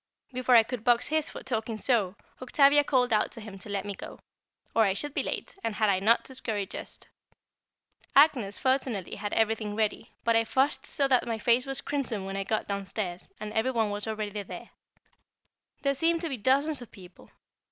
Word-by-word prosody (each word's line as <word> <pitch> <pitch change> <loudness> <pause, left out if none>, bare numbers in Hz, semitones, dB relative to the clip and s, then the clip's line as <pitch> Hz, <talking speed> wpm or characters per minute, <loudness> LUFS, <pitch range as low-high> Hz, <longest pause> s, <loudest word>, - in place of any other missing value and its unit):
Before 250 0 +3
I 230 - +8
could 235 -1 -6
box 240 +1 +3
his 310 0 0
for - - -9
talking 225 -3 -2
so, 210 -6 +1 0.3
Octavia 280 +3 +5
called 250 -4 +2
out 210 - +2
to - - -8
him 210 -3 -9
to 200 - -11
let 200 -1 -2
me 205 - -3
go, - - -9 0.6
or 230 - +5
I 195 -3 +3
should 290 +7 -4
be - - +1
late, - - -4
and 225 - -2
had 215 -2 +3
I 190 - +1
not 220 +4 +3
to 265 - -8
scurry 220 -6 -1
just? - - -8 1.1
Agnès 265 -9 +4
fortunately 260 -8 0
had 205 0 -4
everything 220 -1 +1
ready, 215 -1 -1
but 230 -1 +3
I 225 - +4
fussed 265 +4 0
so 275 - +1
that 255 -2 +2
my 230 -1 -1
face 240 +4 +2
was 270 0 -2
crimson 240 -9 -2
when 195 0 -5
I 195 - -1
got 215 +2 -2
downstairs, 195 -2 -4
and 215 0 -6
every 220 +4 +1
one 225 -4 0
was 205 +1 -4
already 215 -1 -3
there. 195 - -9 1.1
There 275 -1 +2
seemed 330 +3 +1
to 335 - -2
be 270 - -3
dozens 275 +6 +2
of 245 - -10
people. 180 -2 -15
225 Hz, 205 wpm, -28 LUFS, 205-265 Hz, 1.1 s, I